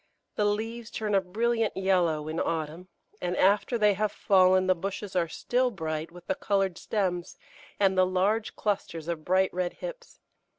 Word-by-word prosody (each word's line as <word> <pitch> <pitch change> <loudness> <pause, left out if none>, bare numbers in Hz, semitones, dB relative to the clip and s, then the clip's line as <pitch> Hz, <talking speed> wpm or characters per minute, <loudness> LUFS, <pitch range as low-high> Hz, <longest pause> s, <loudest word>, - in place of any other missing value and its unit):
The 210 - 0
leaves 225 +3 -2
turn 215 -2 -3
a 195 - +4
brilliant 225 +4 0
yellow 175 -5 +1
in 160 +1 -3
autumn, 165 +2 -3 0.3
and 180 0 -2
after 205 +5 +3
they 210 -2 +4
have 210 +2 0
fallen 185 -1 +4
the 185 - +4
bushes 195 +2 -5
are 175 -2 +2
still 250 +9 0
bright 160 -5 -4
with 175 0 -13
the 190 - 0
coloured 195 -2 0
stems 180 -5 -2 0.4
and 195 -1 +3
the 185 - +5
large 200 +4 0
clusters 180 -6 -2
of 170 -2 -3
bright 185 +2 +2
red 180 -1 -1
hips. - - -9
190 Hz, 170 wpm, -28 LUFS, 175-210 Hz, 0.4 s, the